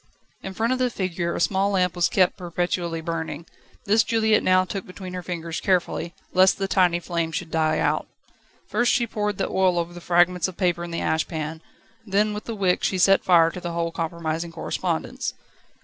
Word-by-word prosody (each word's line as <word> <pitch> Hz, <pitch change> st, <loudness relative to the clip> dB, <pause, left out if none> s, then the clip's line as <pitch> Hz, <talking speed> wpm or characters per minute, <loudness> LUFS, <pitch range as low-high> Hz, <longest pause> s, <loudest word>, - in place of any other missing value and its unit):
In 190 Hz, 0 st, -7 dB
front 230 Hz, +5 st, +1 dB
of 255 Hz, -, -2 dB
the 255 Hz, -1 st, +2 dB
figure 180 Hz, -5 st, -2 dB
a -, -, -2 dB
small 195 Hz, +2 st, +2 dB
lamp 185 Hz, -3 st, +1 dB
was 175 Hz, -1 st, +2 dB
kept 185 Hz, -2 st, +3 dB
perpetually 175 Hz, -2 st, -2 dB
burning. 160 Hz, -1 st, -4 dB, 0.4 s
This 215 Hz, +3 st, +4 dB
Juliette 220 Hz, -1 st, +2 dB
now 185 Hz, 0 st, +3 dB
took 195 Hz, +1 st, -5 dB
between 185 Hz, 0 st, -8 dB
her 180 Hz, -, -4 dB
fingers, 170 Hz, -2 st, -5 dB
carefully, 175 Hz, -2 st, 0 dB, 0.2 s
lest 185 Hz, +1 st, +5 dB
the 195 Hz, -, -1 dB
tiny 180 Hz, -3 st, +3 dB
flame 170 Hz, -2 st, -2 dB
should 160 Hz, -, -4 dB
die 155 Hz, -1 st, +1 dB
out. -, -, 0 dB, 0.6 s
First 240 Hz, 0 st, +1 dB
she 240 Hz, -, +2 dB
poured 210 Hz, -3 st, -2 dB
the 195 Hz, -, -1 dB
oil 185 Hz, -2 st, +2 dB
over 170 Hz, 0 st, -2 dB
the 175 Hz, -, -10 dB
fragments 175 Hz, 0 st, +3 dB
of 185 Hz, -, -9 dB
paper 175 Hz, -2 st, 0 dB
in 175 Hz, -, -6 dB
the 170 Hz, -, -3 dB
ash 160 Hz, 0 st, 0 dB
pan, 160 Hz, 0 st, -5 dB, 0.4 s
then 210 Hz, 0 st, +1 dB
with 210 Hz, -, -6 dB
the 230 Hz, -, -4 dB
wick 190 Hz, -3 st, +1 dB
she 190 Hz, -, +1 dB
set 195 Hz, +2 st, +4 dB
fire 165 Hz, -2 st, +5 dB
to 180 Hz, -, -8 dB
the 175 Hz, -1 st, -4 dB
whole 170 Hz, 0 st, -1 dB
compromising 165 Hz, 0 st, -3 dB
correspondence. 165 Hz, -, -3 dB
180 Hz, 200 wpm, -24 LUFS, 170-195 Hz, 0.6 s, lest